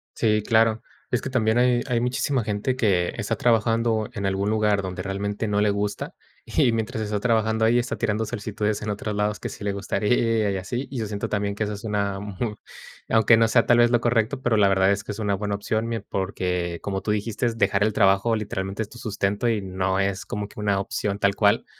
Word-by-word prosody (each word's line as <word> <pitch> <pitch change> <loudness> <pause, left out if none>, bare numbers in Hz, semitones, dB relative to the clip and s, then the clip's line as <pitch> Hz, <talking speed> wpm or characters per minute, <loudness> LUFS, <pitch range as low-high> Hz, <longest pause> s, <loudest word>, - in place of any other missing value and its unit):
Sí, 105 -2 +2
claro. 115 0 +3 0.3
Es 125 - 0
que - - -3
también 110 -3 +2
hay 125 -1 +3
hay 120 -2 +1
muchísima 125 +1 0
gente 105 +5 -1
que 95 -8 +1
está 115 0 -1
trabajando 115 -1 +1
en 100 -3 -4
algún 95 +1 -1
lugar 105 -2 +2
donde 90 0 -4
realmente 100 +3 -3
no 105 0 +1
le 105 - +3
gusta, 100 0 -3 0.3
y, 120 - +2
mientras 115 0 -2
está 105 -1 -2
trabajando 110 0 +1
ahí, 120 +2 +4
está 120 +1 -2
tirando 110 -1 0
solicitudes 105 0 -2
en 110 - -3
otros 105 0 -4
lados 105 0 -1
que - - -4
sí - - -9
le 100 - 0
gustaría 105 +2 +1
y 95 - -2
así. 120 +8 -4
Y 130 - -4
yo 110 - -2
siento 100 0 -4
también 100 -1 -1
que 110 - -1
esa 105 0 -3
es 105 +1 -8
una 100 -2 -1
mu 105 +2 -4 0.5
aunque 110 0 +5
no 115 - +4
sea 115 +1 +3
tal 120 - +4
vez 120 0 +6
lo 120 -1 +3
correcto, 120 +2 +1
pero 120 -2 +2
la 100 -1 +5
verdad 95 0 +3
es 100 0 -1
que 105 - -6
es 105 - -9
una 105 -2 0
buena 105 +1 -2
opción, 110 +2 -2
mie 115 -2 -3
porque, 90 -3 -2
como 95 -1 -2
tú 105 - -5
dijiste, 105 +3 -1
dejar 105 -2 +2
el 110 0 +1
trabajo 100 +3 +3
literalmente 100 -1 -3
es 105 - -11
tu - - -13
sustento, 105 +2 -1
y 110 -3 +1
no 95 0 -1
es 95 -1 -1
como 105 0 -4
que 105 - -13
una 100 -2 +1
opción 100 +1 -2
tal 100 -1 +2
cual. - - +3
105 Hz, 230 wpm, -24 LUFS, 100-115 Hz, 0.5 s, vez